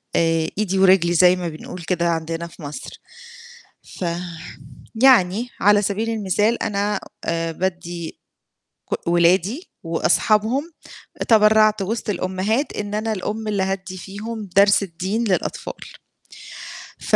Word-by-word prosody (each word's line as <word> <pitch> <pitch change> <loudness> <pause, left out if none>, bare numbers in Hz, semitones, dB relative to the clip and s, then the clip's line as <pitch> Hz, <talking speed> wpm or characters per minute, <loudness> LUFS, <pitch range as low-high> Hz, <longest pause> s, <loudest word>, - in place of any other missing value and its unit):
آآ 165 -1 +2
إيدي 195 -3 0
ورجلي 185 -2 +5
زي 180 +1 +6
ما 175 -2 -3
بنقول 165 +3 -9
كده 170 0 0
عندنا 165 0 -2
في 170 - -16
مصر، 145 0 -8 1.0
ف 180 - -2 1.0
يعني 235 -3 +5
على 205 +1 +5
سبيل 210 +3 -1
المثال 215 +1 0
أنا 205 -1 -1 0.3
آآ 165 0 -1
بادّي 175 -1 -4 0.7
ك - - -3
ولادي 180 - +2
وأصحابهم، 215 - +1 0.6
تبرّعت 215 -1 +5
وسط 220 +3 -2
الأمهات 190 +8 -1
إن 205 0 -4
أنا 220 +1 -1
الأم 215 +2 -4
اللي 200 -2 0
هادّي 190 0 -3
فيهم 210 +3 -7
درس 200 +1 +6
الدين 190 +5 -2
للأطفال. 190 -6 -2 1.3
ف - - +1
195 Hz, 120 wpm, -21 LUFS, 175-215 Hz, 1.3 s, زي